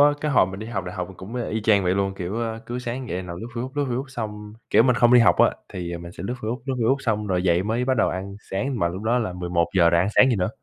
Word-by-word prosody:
á, 145 0 +7
cái 150 - -1
hồi 125 -8 +5
mình 95 +1 -7
đi 110 - -6
học 115 -6 -3
đại 90 - -6
học 90 -1 -4
mình 95 - -12
cũng, 100 +6 -9
ơ, 120 - -2
y 110 0 -2
chang 105 -3 +3
vậy 90 +1 +2
luôn. 95 -1 0
Kiểu, 95 +5 -4
a, 115 -1 -3
cứ 120 +1 -4
sáng 125 0 -5
dậy 90 +1 -3
nằm 85 -1 -7
lướt 115 - -6
Facebook, 125 +2 -4
lướt 145 -1 0
Facebook 130 +3 -2
xong 105 -4 -6 0.2
kiểu, - - +6
mình 125 -1 +3
không 120 +1 +5
đi 120 - +8
học 115 - +5
á - - +5 0.2
thì, 85 -1 -5
à, - - -5
mình 85 0 -9
sẽ - - -9
lướt 125 - -2
Facebook, 115 +4 -3
lướt 135 - -1
Facebook 120 +4 +3
xong 105 -4 -1
rồi 90 -2 0
dậy 90 0 +2
mới 115 +4 -1
bắt 130 -1 +1
đầu 110 - +3
ăn 95 +2 -5 0.2
sáng 125 +6 -2
mà 85 - +2
lúc 95 +4 -6
đó 120 +3 +2
là 110 -6 -2
11:00 85 0 +2
rồi 85 - +4
ăn 95 - +1
sáng 130 - +7
gì 115 - +1
nữa. 90 - 0
105 Hz, 330 wpm, -24 LUFS, 90-120 Hz, 0.2 s, đi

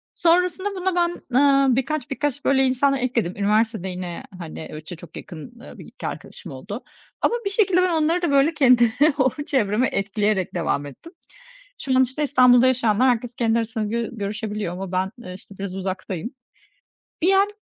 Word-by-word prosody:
Sonrasında 360 +3 +2
buna 370 -1 -1
ben, 345 -7 -1
aaa, 275 -2 +4
birkaç 265 +1 -2
birkaç, 290 +1 -2
böyle, 270 -1 +4
insanlar 265 +1 +2
ekledim. 235 -8 -1
Üniversitede 210 -1 +1
yine, 180 -1 -6 0.2
hani, 160 -2 -7
öyle 155 0 -8
ço 175 +2 -8
çok 165 -1 -12
yakın, 195 +8 -10
eee, - - -12
1-2 - - -8
arkadaşım - - -8
oldu - - -7 0.4
ama 475 - +2
bir - - +1
şekilde 390 -3 +3
ben 365 -1 +1
onları 335 +4 +1
da, 340 - 0
böyle, 280 +3 +4
kendi 250 -6 +5 0.3
o 260 - +4 0.2
çevreme 235 -1 +1
etkileyerek 200 -1 -1
devam 155 -4 -1
ettim. 235 - -12 0.7
Şu 265 -2 0
an, 260 - +6
işte, 260 +4 -2
İstanbul'da 255 -3 +5
yaşayanlar 250 -1 +3
herkes 245 0 -1
kendi 230 -1 +1
arasında 225 -1 -2
gö 230 +2 -2
görüşebiliyor 210 -3 -4
ama 185 0 -6
ben, 185 +1 -1
eee, 180 - -7
işte, 195 +1 -13
biraz 195 -2 -5
uzaktayım. 190 0 -4 0.9
Bir 375 +4 +4
an, 395 +1 +4
240 Hz, 175 wpm, -23 LUFS, 195-280 Hz, 0.9 s, an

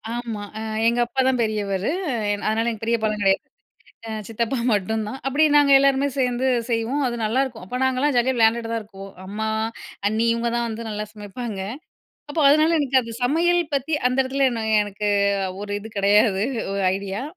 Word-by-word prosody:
ஆமா. 230 -3 -4 0.2
அ - - -4 0.3
எங்க 235 +1 +2
அப்பா 240 +3 -5
தான் 260 -2 +2
பெரியவரு. 210 0 -1 0.4
என் 205 - -5
அதனால 225 +2 +1
எங்க 220 - -8
பெரியப்பாலாம் 220 -2 0
கெடையாது. 195 -1 +2 0.7
அ - - -4 0.2
சித்தப்பா 230 +3 -2 0.2
மட்டும்தான். 215 +4 -2
அப்டி 285 +4 +3
நாங்க 290 -1 +5
எல்லோருமே 275 0 +3
சேந்து 250 0 +1 0.2
செய்வோம். 235 +5 0
அது 240 - -3
நல்லாருக்கும். 235 0 -1
அப்போ 250 +7 -4
நாங்கலாம் 260 +3 +1
ஜாலியா 245 +2 +2
விளையாண்டுட்டு 230 0 +2
தான் 230 -1 -1
இருக்குவோம். 195 -2 -11
அம்மா, 210 +3 -4 0.6
அண்ணி, 220 +2 +1
இவுங்க 235 0 -1
தான் 235 0 0
வந்து 225 0 -5
நல்லா 210 0 -4
சமைப்பாங்க. 210 0 -6 0.7
அப்போ 315 - -1
அதனால 310 +3 +4
எனக்கு 265 -2 +3
அது 230 -1 -8
சமையல் 340 +7 +3
பத்தி 280 +3 -2 0.2
அந்த 255 +1 -2
எடத்துல 265 +1 +1
நான் 220 -1 +1
எனக்கு 205 0 -3 0.5
ஒரு 205 0 -5
இது 220 - -9
கிடையாது 200 0 +3 0.3
1 200 0 -1
ஐடியா. 200 +3 -4
230 Hz, 170 wpm, -23 LUFS, 210-260 Hz, 0.7 s, நாங்க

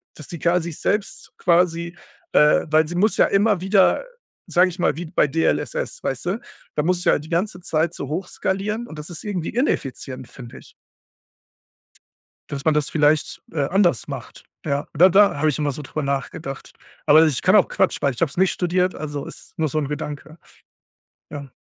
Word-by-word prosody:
dass 155 - -10
die 170 - -7
K 170 +3 +2
sich 170 -2 -6
selbst 205 -1 -2
quasi, 170 -1 +1 0.4
äh 150 0 +5
weil 155 +1 +4
sie 175 - -5
muss 205 +5 +2
ja - - +4
immer 200 -1 +2
wieder, 195 - +3 0.4
sage 180 +1 +4
ich 180 +1 -10
mal 170 - +1
wie 175 - -5
bei 155 -1 +1
DLSS, 160 +4 -1
weißt 135 +2 -3
du? 190 +6 -1 0.4
Da 150 - +1
musst 180 +2 0
du - - +4
ja - - +2
die 150 +2 -11
ganze 180 +2 -1
Zeit 165 0 0
so 140 - -6
hochskalieren. 195 +6 -2
Und 155 - -9
das 150 - -7
ist 170 - -7
irgendwie 190 -6 -3
ineffizient, 135 - -2
finde 120 -2 -11
ich. - - -18 1.8
Dass 140 -1 -5
man 155 - +3
das 150 -1 0
vielleicht, 150 0 +1
äh, 155 -3 -1
anders 175 - +2
macht. - - -8 0.2
Ja, 140 -1 -1
da 175 +5 +7
da 200 0 +5
habe 155 +2 +2
ich 150 - 0
immer 145 -2 0
so 150 - -7
darüber 150 +2 -4
nachgedacht. 140 0 -4 0.3
Aber 155 +2 +7
ich 145 -5 -1
kann 185 +3 +5
auch 200 - +5
Quatsch, - - +1
weil 140 - +1
ich - - -9
habe 165 - +2
es - - -12
nicht 190 +1 +3
studiert. 180 +1 0
Also, 145 -2 -5
ist - - -12
nur 160 -1 +1
so 155 - -2
'n 145 -3 -2
Gedanke. 150 +1 -6 0.9
Ja. 140 -1 -7
160 Hz, 195 wpm, -22 LUFS, 145-180 Hz, 1.8 s, da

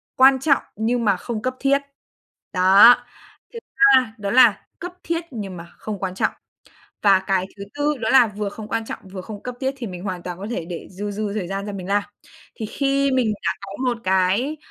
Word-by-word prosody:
quan 265 0 +6
trọng 275 0 +2
nhưng 230 +2 0
mà 200 -3 +3
không 220 +2 -5
cấp 255 +1 -2
thiết, 275 0 +2 0.7
đó! 195 +6 +8 0.6
Thứ 465 - -6 0.4
ba 250 -4 0
đó 200 -1 -3
là 240 -6 +6 0.2
cấp 355 +1 -6
thiết 335 0 -1
nhưng 200 -6 -6
mà 170 - -9
không 210 -3 -6
quan 185 -1 -3
trọng. - - +1 0.7
Và 195 -2 +6
cái 190 -2 +1
thứ 200 - -7
tư 290 +1 0
đó - - -2
là 260 -3 +7
vừa 205 0 -4
không 215 +1 -9
quan 225 - -2
trọng, - - -6
vừa 190 - -6
không 205 +2 -9
cấp 250 -1 -5
thiết, 265 +1 -1
thì 235 - -5
mình 180 -2 -7
hoàn 185 -3 -4
toàn 180 -1 -6
có 200 - -6
thể 205 -8 -3
để 170 0 -7
dư 205 +2 -5
dư 205 0 -3
thời 185 -5 -3
gian 195 +1 -4
ra 205 - -5
mình 185 -2 -6
làm. 205 +1 +2 0.5
Thì 220 - -4
khi 275 +3 0
mình 245 -4 +2
đã - - +2
có 195 0 -8
một 245 -2 0
cái, 190 +10 +1
210 Hz, 220 wpm, -22 LUFS, 195-255 Hz, 0.7 s, đó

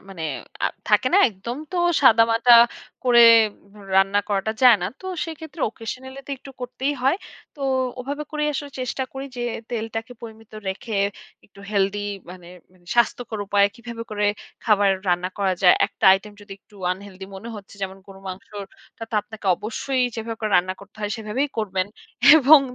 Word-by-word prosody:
মানে 175 -4 -8 0.4
আ - - +5 0.2
থাকে - - +4
না? - - +7
একদম 225 +4 -7 0.2
তো - - -2 0.3
সাদামাটা 230 0 +5 0.5
করে 245 -1 +6 0.7
রান্না 195 +1 +4
করাটা 205 +1 0
যায় 245 -3 +8
না। 180 - 0
তো 375 - -9 0.2
সেক্ষেত্রে, 320 -1 -9
occasionally 260 +4 -8
তো - - -9
একটু 275 - -13
করতেই 255 +3 -2
হয়। 270 +6 +3 0.4
তো 285 - -14 0.4
ওভাবে 285 +4 -4
করেই 300 -1 -1
আসলে 285 +1 -4
চেষ্টা 255 +1 -2
করি 270 +1 -6
যে, 240 - -3 0.3
তেলটাকে 225 0 -4
পরিমিত 225 -1 -11 0.2
রেখে, 200 +3 -4 0.5
একটু 200 -1 -18
হেলথি 200 0 +1 0.3
মানে 180 -1 -12 0.5
স্বাস্থ্যকর 235 -1 +1
উপায়ে 200 0 +4
কিভাবে 235 -1 -8
করে 210 -1 -1 0.4
খাবার 205 -3 +4 0.2
রান্না 180 +1 +1
করা 195 -2 +1
যায়। 180 - +8
একটা - - -6
আইটেম 200 +2 -1
যদি 205 -1 -11
একটু 205 - -26 0.2
unhealthy 190 0 -7
মনে 225 +5 -9
হচ্ছে, 200 -1 -12
যেমন 190 0 -4
গরুর 195 0 -13
মাংসটা 200 +4 -10
তো - - -5
আপনাকে 215 -1 -10
অবশ্যই 255 +6 -2
যেভাবে 225 0 -5
করে 215 -1 -2
রান্না 185 +1 +1
করতে 200 +1 -16
হয় 210 -1 -2
সেভাবেই 225 +6 -2
করবেন 190 -3 -1 0.5
এবং 295 0 +8
220 Hz, 160 wpm, -23 LUFS, 195-250 Hz, 0.7 s, যায়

